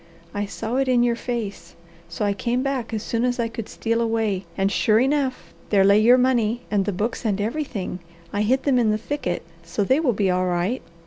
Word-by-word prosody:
"I 205 Hz, 0 st, -2 dB
saw 225 Hz, +4 st, -3 dB
it 270 Hz, 0 st, +1 dB
in 245 Hz, -2 st, +4 dB
your 240 Hz, -1 st, +2 dB
face, 230 Hz, -4 st, -5 dB, 0.3 s
so 170 Hz, +5 st, -2 dB
I 200 Hz, -, +2 dB
came 240 Hz, +5 st, -1 dB
back 270 Hz, -4 st, -2 dB
as 220 Hz, -1 st, -3 dB
soon 230 Hz, 0 st, -1 dB
as 245 Hz, 0 st, 0 dB
I 235 Hz, -, +1 dB
could 230 Hz, -1 st, -7 dB
steal 230 Hz, 0 st, -1 dB
away, 220 Hz, -5 st, 0 dB
and 195 Hz, 0 st, +1 dB
sure 215 Hz, +1 st, +3 dB
enough, 260 Hz, -, 0 dB, 0.2 s
there 200 Hz, -2 st, +4 dB
lay 200 Hz, +2 st, +6 dB
your 240 Hz, +4 st, +6 dB
money 245 Hz, -2 st, +2 dB
and 200 Hz, -2 st, +2 dB
the 205 Hz, -, 0 dB
books 210 Hz, +5 st, -2 dB
and 205 Hz, -3 st, 0 dB
everything. 215 Hz, -5 st, -3 dB, 0.3 s
I 205 Hz, -, 0 dB
hid 255 Hz, +5 st, +2 dB
them 265 Hz, -3 st, +3 dB
in 230 Hz, -3 st, +3 dB
the 215 Hz, -, +2 dB
thicket, 220 Hz, -6 st, -3 dB, 0.2 s
so 205 Hz, -, -2 dB
they 260 Hz, +8 st, +3 dB
will 280 Hz, -7 st, +2 dB
be 195 Hz, -2 st, +1 dB
all 185 Hz, 0 st, +1 dB
right. 180 Hz, +8 st, 0 dB
225 Hz, 220 wpm, -23 LUFS, 200-250 Hz, 0.3 s, lay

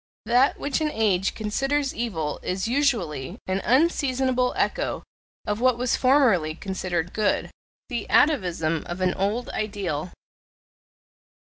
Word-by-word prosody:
That 250 Hz, +3 st, +3 dB
which 285 Hz, +2 st, -1 dB
an 310 Hz, -, +1 dB
age 200 Hz, -7 st, +1 dB
considers 270 Hz, +6 st, -1 dB
evil 165 Hz, -11 st, -3 dB
is 185 Hz, +3 st, -2 dB
usually 210 Hz, -, 0 dB
an 190 Hz, +1 st, -1 dB
unseasonable 260 Hz, -, +2 dB
echo -, -, -1 dB, 0.4 s
of 210 Hz, +2 st, -2 dB
what 255 Hz, -2 st, +3 dB
was 250 Hz, 0 st, +1 dB
formerly 235 Hz, -, +3 dB
considered 180 Hz, -2 st, -3 dB
good 215 Hz, -1 st, 0 dB, 0.4 s
the 240 Hz, -4 st, -4 dB
atavism 175 Hz, -, +2 dB
of 175 Hz, +1 st, -5 dB
an 185 Hz, -1 st, +2 dB
old 210 Hz, +6 st, -1 dB
ideal. 190 Hz, -6 st, -3 dB
215 Hz, 120 wpm, -25 LUFS, 180-260 Hz, 0.4 s, That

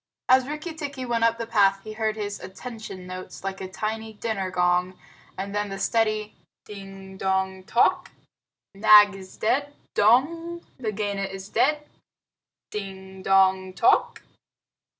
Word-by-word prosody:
As 260 Hz, 0 st, +5 dB
Rikki 305 Hz, +3 st, -5 dB
tikki 280 Hz, -4 st, -5 dB
went 235 Hz, -1 st, 0 dB
up 230 Hz, 0 st, +3 dB
the 230 Hz, -, -3 dB
path, 195 Hz, -3 st, +3 dB
he 215 Hz, -, -7 dB
heard 215 Hz, -1 st, -1 dB
his 205 Hz, -1 st, -4 dB
"attention" 215 Hz, -2 st, -8 dB
notes 185 Hz, 0 st, -8 dB
like 195 Hz, 0 st, -4 dB
a 190 Hz, -, -5 dB
tiny 220 Hz, +3 st, -4 dB
dinner 205 Hz, -3 st, -3 dB
gong, 180 Hz, 0 st, +1 dB, 0.4 s
and 195 Hz, +1 st, -4 dB
then 205 Hz, 0 st, -1 dB
the 195 Hz, -, -5 dB
steady 215 Hz, 0 st, 0 dB, 0.3 s
"Ding 195 Hz, -1 st, -10 dB
dong 190 Hz, 0 st, -1 dB
tock! 235 Hz, -, +2 dB, 0.6 s
Nag 210 Hz, 0 st, +7 dB
is 190 Hz, -1 st, -11 dB
dead 285 Hz, +6 st, 0 dB, 0.2 s
dong! 330 Hz, +11 st, +2 dB
Nagaina 205 Hz, -4 st, -2 dB
is 195 Hz, 0 st, -8 dB
dead! 295 Hz, +7 st, +2 dB, 0.9 s
Ding 190 Hz, -2 st, -7 dB
dong 190 Hz, -1 st, +3 dB
tock!" 185 Hz, +5 st, +2 dB
205 Hz, 135 wpm, -25 LUFS, 190-230 Hz, 0.9 s, Nag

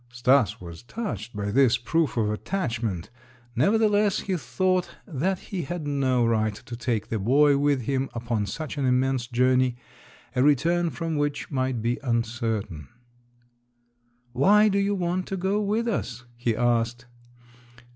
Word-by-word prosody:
Stas 120 Hz, -1 st, +2 dB
was 85 Hz, -2 st, -9 dB
touched 120 Hz, -, -6 dB
by 105 Hz, 0 st, -2 dB
this 130 Hz, 0 st, +4 dB
proof 150 Hz, +4 st, 0 dB
of 105 Hz, -2 st, +1 dB
attachment; 115 Hz, -, -3 dB, 0.4 s
nevertheless, 210 Hz, -, +3 dB
he 190 Hz, -, -2 dB
thought 180 Hz, +7 st, 0 dB, 0.2 s
that 180 Hz, +5 st, -1 dB, 0.2 s
he 185 Hz, -, -1 dB
had 165 Hz, +1 st, -5 dB
no 130 Hz, -4 st, +1 dB
right 110 Hz, -2 st, +1 dB
to 120 Hz, -, -9 dB
take 115 Hz, -3 st, -2 dB
the 110 Hz, -, -1 dB
boy 140 Hz, +7 st, +4 dB
with 140 Hz, -2 st, +1 dB
him 135 Hz, +2 st, -1 dB
upon 115 Hz, -3 st, -2 dB
such 150 Hz, -, -5 dB
an 135 Hz, -, 0 dB
immense 130 Hz, -1 st, +1 dB
journey, 125 Hz, 0 st, +2 dB, 0.6 s
a 125 Hz, -, +2 dB
return 165 Hz, +5 st, +3 dB
from 165 Hz, -1 st, -3 dB
which 145 Hz, +1 st, -2 dB
might 130 Hz, -4 st, -1 dB
be 120 Hz, +4 st, 0 dB
uncertain. 115 Hz, -, -2 dB, 1.5 s
"Why 210 Hz, +11 st, +5 dB
do 200 Hz, 0 st, +1 dB
you 200 Hz, +1 st, +1 dB
want 180 Hz, 0 st, -1 dB
to 195 Hz, -, -3 dB
go 190 Hz, +3 st, 0 dB
with 215 Hz, +3 st, 0 dB
us?" 130 Hz, -, -3 dB
he 120 Hz, -1 st, -1 dB
asked. 120 Hz, +1 st, 0 dB
130 Hz, 145 wpm, -25 LUFS, 115-170 Hz, 1.5 s, Why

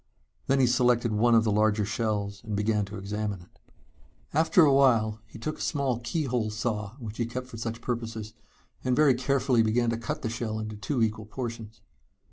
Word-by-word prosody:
Then 135 Hz, 0 st, +3 dB
he 130 Hz, -, +5 dB
selected 120 Hz, -1 st, +3 dB
one 115 Hz, +3 st, +4 dB
of 110 Hz, -, +5 dB
the 110 Hz, -, +1 dB
larger 105 Hz, 0 st, +2 dB
shells 105 Hz, -1 st, -2 dB
and 110 Hz, -2 st, -4 dB
began 105 Hz, 0 st, +1 dB
to 100 Hz, +1 st, -8 dB
examine 105 Hz, 0 st, -3 dB
it. 90 Hz, -, -21 dB, 0.7 s
After 160 Hz, +3 st, +5 dB
a 140 Hz, -, +4 dB
while 115 Hz, -6 st, +3 dB
he 110 Hz, -, -12 dB
took 155 Hz, +8 st, -4 dB
a -, -, -7 dB
small 135 Hz, -5 st, 0 dB
keyhole 125 Hz, -4 st, -1 dB
saw 105 Hz, -1 st, -3 dB
which 110 Hz, -5 st, -8 dB
he 120 Hz, -, 0 dB
kept 125 Hz, +2 st, -5 dB
for 125 Hz, -2 st, -10 dB
such 115 Hz, +1 st, -4 dB
purposes, 115 Hz, -3 st, -4 dB, 0.5 s
and 130 Hz, -1 st, +1 dB
very 150 Hz, -2 st, +5 dB
carefully 130 Hz, -1 st, +2 dB
began 115 Hz, +2 st, +2 dB
to 115 Hz, -, -1 dB
cut 115 Hz, -, -4 dB
the -, -, 0 dB
shell 115 Hz, -1 st, -3 dB
into 110 Hz, 0 st, -5 dB
two 115 Hz, +4 st, -1 dB
equal 110 Hz, -1 st, -2 dB
portions. 115 Hz, -2 st, -6 dB
115 Hz, 195 wpm, -27 LUFS, 110-125 Hz, 0.7 s, he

